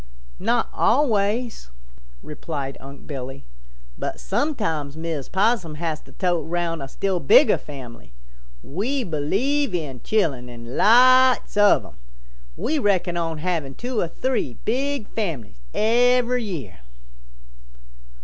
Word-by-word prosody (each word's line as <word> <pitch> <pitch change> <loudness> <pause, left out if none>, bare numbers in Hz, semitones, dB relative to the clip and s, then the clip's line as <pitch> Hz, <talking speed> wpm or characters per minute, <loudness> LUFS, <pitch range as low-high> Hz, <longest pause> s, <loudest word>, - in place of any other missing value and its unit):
"Not 230 +4 +1
always," 225 - +1 0.5
replied 145 -3 -5
Unc' 140 0 -12
Billy. 135 - -7 0.5
"But - - -4
sometimes 155 - -2
Mrs. 160 -4 -4
Possum 190 -5 +1
has 160 -1 -3
to - - -18
tote 175 -5 -1
around 170 -2 -2
a 135 - -5
still 190 +5 -1
bigger 140 - +5
family. 125 - -11 0.5
We 245 - -2
believe 200 - 0
in 145 -7 -4
chillun 140 - 0
and 120 +1 -9
lots 255 +3 +5
of 205 0 +5
them. - - -15 0.6
We 305 +2 0
reckon 185 -6 +1
on 165 -2 -2
havin' 155 -5 -2
two 245 -2 -3
or 175 - +1
three 170 - -2
big 270 0 -1
families 155 - -4
every 245 +2 +2
year." 135 - -6
175 Hz, 120 wpm, -23 LUFS, 145-235 Hz, 0.6 s, bigger